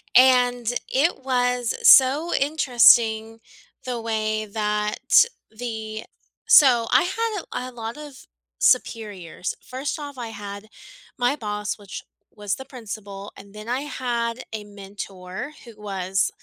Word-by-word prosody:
and 245 -2 +5 0.2
it 275 0 +1
was 250 -2 0
so 280 +6 +7
interesting 235 -6 +4 0.5
the 245 -2 -3
way 215 -1 -1
that 210 - +2 0.2
the 220 -1 -6 0.4
so 245 -6 +6
I - - +5
had 430 +1 -2 0.2
a 255 - -6
a - - -13
lot 230 +1 -7
of 295 -3 -11 0.3
superiors. 205 -7 0
First 265 +5 -4
off, 285 -2 -8
I 240 - -5
had 205 -1 -8 0.5
my 250 +3 +1
boss, 210 -2 -4
which 200 -1 -8 0.3
was 205 -1 -2
the 265 - -10
principal, 205 -6 -8
and 200 0 -14
then 215 +2 -9
I 255 +3 -1
had 240 -3 -3
a 210 -1 -5
mentor 195 +3 -8
who 215 -3 -14
was 195 -1 -1
230 Hz, 130 wpm, -23 LUFS, 210-255 Hz, 0.5 s, so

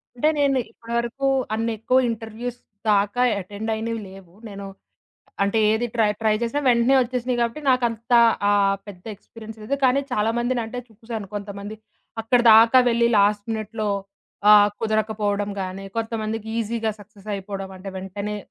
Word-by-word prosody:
అంటే 300 +6 +2
నేను 275 -2 +3
ఇప్పటి 230 0 -9
వరకు 240 +4 -2 0.3
అన్నెక్కువ 225 +2 0
ఇంటర్వ్యూస్ 230 +2 -6 0.3
దాకా 205 +4 +2 0.2
అటెండ్ 205 +4 -5
అయినవి 225 +1 -3
లేవు. 190 -2 -14
నేను 200 -1 -8 0.8
అంటే 200 +3 +1
ఏది 235 +2 0
ట్రై 225 -3 +3
ట్రై 220 -1 +2
చేసినా 235 +5 -1
వెంటనే 240 +2 +4
వచ్చేసినాయి 250 0 -1
కాబట్టి 235 +6 -1
నాకంత 240 -2 0 0.4
ఆహ్, 200 -1 +3
పెద్ద 180 -3 -11
ఎక్స్పీరియన్స్ 220 +2 -12
లేదు. 275 +6 -1
కానీ 260 +2 +4
చాలామందిని 240 +3 0
అంటే 235 +3 -6
చూసాను, 225 -1 -7
కొంతమంది 205 +1 -6 0.4
అక్కడి 240 +2 +2
దాకా 225 +3 +7
వెళ్లి 235 0 +3
లాస్ట్ 205 0 +2
మినిట్‌లో 215 0 -3 0.6
ఆహ్, 205 -1 +8
కుదరకపోవడం 215 -2 -1
గానీ, 190 +1 -6
కొంతమందికి 225 -1 -3
ఈజీగా 225 0 -1
సక్సెస్ 205 0 -15
అయిపోవడం. 195 0 -6
అంటే 185 +1 -9
వెంటనే 200 +2 -5
220 Hz, 140 wpm, -23 LUFS, 205-235 Hz, 0.8 s, ఆహ్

